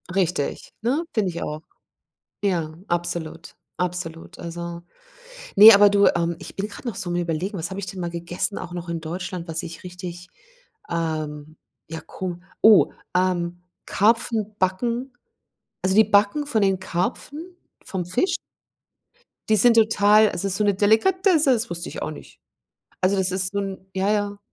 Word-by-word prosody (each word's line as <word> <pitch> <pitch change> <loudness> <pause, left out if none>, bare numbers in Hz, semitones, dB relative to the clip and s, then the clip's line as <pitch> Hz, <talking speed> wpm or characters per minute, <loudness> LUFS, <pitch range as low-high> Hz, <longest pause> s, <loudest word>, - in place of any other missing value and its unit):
Richtig, 180 -6 -1
ne, 260 +9 0
finde 210 -4 +1
ich 170 - -5
auch. 150 +1 -5 0.8
Ja, 170 -6 0
absolut, 170 -1 -3 0.2
absolut. 180 -1 -4
Also, 170 0 -6 0.8
ne, 215 +3 +11
aber 205 0 +7
du, 200 0 +4
ähm, 170 0 -1
ich - - -10
bin 200 +2 -2
grad 210 - -11
noch 235 - -2
so 180 - -4
am 175 - -1
Überlegen, 175 +3 -2
was 165 +1 -3
habe 190 +1 -5
ich 195 - -5
denn 190 -1 -7
mal 175 -1 -3
gegessen 170 +4 -3
auch 175 -1 -8
noch 175 -1 -6
in 170 -1 -3
Deutschland, 175 +2 -5
was 165 0 -3
ich 165 0 -9
richtig, 180 -1 -8 0.6
ähm, 155 -2 -3 0.3
ja, 160 0 -6
Ko 180 -2 -6 0.2
oh, 215 -2 +7 0.2
ähm, 175 -1 0 0.2
Karpfenbacken, 220 +2 0 0.7
also 190 0 +1
die 220 - +8
Backen 210 +8 +2
von 225 -7 +1
den 195 -1 +2
Karpfen 285 - -4 0.3
vom 185 -2 -4
Fisch 255 - 0 1.1
die 215 - +5
sind 230 +3 +5
total 215 -1 +5
also 180 +3 -2
ist 195 0 -1
so 210 - +1
'ne 205 -1 +3
Delikatesse, 305 - +3
das 235 0 -1
wusste 170 0 -5
ich - - -7
auch - - -3
nicht. - - -12 0.6
Also 185 +2 +2
das 190 -1 +2
ist 185 +1 0
so 200 - -1
'n, 195 -1 -4 0.2
ja, 190 +2 +1
ja, 205 -1 -1
185 Hz, 165 wpm, -23 LUFS, 170-210 Hz, 1.1 s, ne